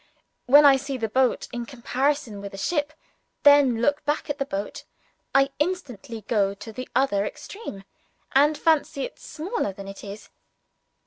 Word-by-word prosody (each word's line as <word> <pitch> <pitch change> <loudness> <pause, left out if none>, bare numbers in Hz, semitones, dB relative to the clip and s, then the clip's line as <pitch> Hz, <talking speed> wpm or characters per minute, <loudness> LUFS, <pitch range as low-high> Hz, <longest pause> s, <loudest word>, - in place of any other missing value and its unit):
When 290 +3 +8
I 275 -1 +8
see 275 0 -4
the 225 -2 -1
boat 255 +3 +1
in 240 -1 -4
comparison 255 -2 -1
with 200 0 -7
a - - -9
ship, 295 - 0
and - - -26 0.5
then 285 -5 +6
look 290 +3 +2
back 295 0 -1
at 290 - -6
the 275 - -1
boat, 200 -2 -5 0.5
I 275 0 +5
instantly 255 - -3
go 200 -2 0
to 220 +2 -10
the 255 +2 -7
other 250 -7 +2
extreme, 210 - -7 0.5
and 290 +3 +4
fancy 310 -4 +1
it - - -7
smaller 330 - -3
than 195 +1 -9
it 195 0 -9
is. 205 +1 -9
265 Hz, 170 wpm, -25 LUFS, 210-290 Hz, 0.5 s, When